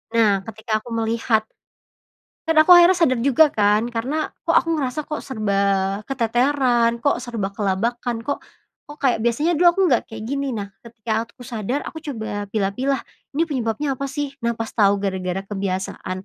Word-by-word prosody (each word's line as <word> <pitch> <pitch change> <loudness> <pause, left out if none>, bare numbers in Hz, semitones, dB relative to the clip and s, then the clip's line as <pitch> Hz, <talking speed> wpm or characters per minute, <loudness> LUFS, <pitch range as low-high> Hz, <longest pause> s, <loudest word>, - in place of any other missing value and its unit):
Nah 205 -4 +3
ketika 220 0 -2
aku 240 - -10
melihat 225 -1 +1 1.1
kan 325 - +2
aku 360 - +7
akhirnya 350 +1 +8
sadar 255 -9 +2
juga 280 +4 +4
kan 210 +3 +2
karena, 270 +7 -2 0.2
"Kok - - +4
aku 330 - +3
ngerasa 260 +2 -2
kok 305 - -4
serba 200 -4 0
keteteran, 245 -1 +2
kok 245 +1 0
serba 230 -6 -4
kelabakan, 225 +4 -2
kok, 285 - -2 0.5
kok 295 - -10
kayak 265 -6 +1
biasanya 240 +9 +1
dulu 345 +2 +5
aku 345 +3 +2
nggak 260 -10 +3
kayak 220 -1 -8
gini," 275 -1 -2
nah, 200 -1 -6
ketika 225 -1 -4
aku 245 - -14
sadar 240 +3 -3
aku 320 - -7
coba 220 -8 -5
pilah-pilah, 225 +6 -1 0.3
ini 325 - +3
penyebabnya 270 -2 -2
apa 275 - -2
sih? 280 0 -4
Nah, 235 0 -1
pas 225 -1 -5
tau 200 -2 +4
gara-gara 190 -1 -3
kebiasaan 190 -1 -4
235 Hz, 165 wpm, -22 LUFS, 210-275 Hz, 1.1 s, akhirnya